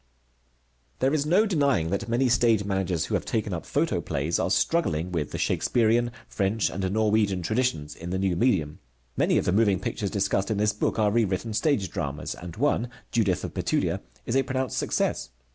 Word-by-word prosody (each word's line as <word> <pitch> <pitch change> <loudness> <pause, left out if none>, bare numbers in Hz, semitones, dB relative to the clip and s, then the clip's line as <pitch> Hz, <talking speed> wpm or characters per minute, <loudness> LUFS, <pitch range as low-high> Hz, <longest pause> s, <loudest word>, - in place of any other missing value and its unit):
There 135 +2 +1
is 150 -1 +1
no 190 +7 +4
denying 140 - +1
that 115 +4 -2
many 120 +3 +2
stage 115 -3 +3
managers 95 -5 -1
who - - -5
have - - +1
taken - - -2
up - - -5
photoplays 75 +5 0
are - - 0
struggling 90 - +1
with 80 -5 -2
the - - -5
Shakespearian 120 0 +2 0.2
French 100 +2 0
and 95 0 -2
Norwegian 105 -3 +1
traditions 85 - -1
in 85 - -8
the 95 - -1
new 95 -2 0
medium. 80 - +1 0.4
Many - - +2
of - - 0
the - - +2
moving 100 -2 +3
pictures 100 - -3
discussed 100 +1 0
in 110 - 0
this 105 0 +2
book 105 - -1
are 105 -2 +3
rewritten 110 -1 0
stage 105 - +1
dramas, 70 +2 -4
and 85 -1 -9
one, 125 -2 +1 0.2
Judith 100 -7 +1
of - - -5
Bethulia, - - 0 0.2
is 115 - -2
a 135 - +5
pronounced 130 -2 -2
success. 65 - -1
105 Hz, 185 wpm, -26 LUFS, 90-120 Hz, 0.4 s, a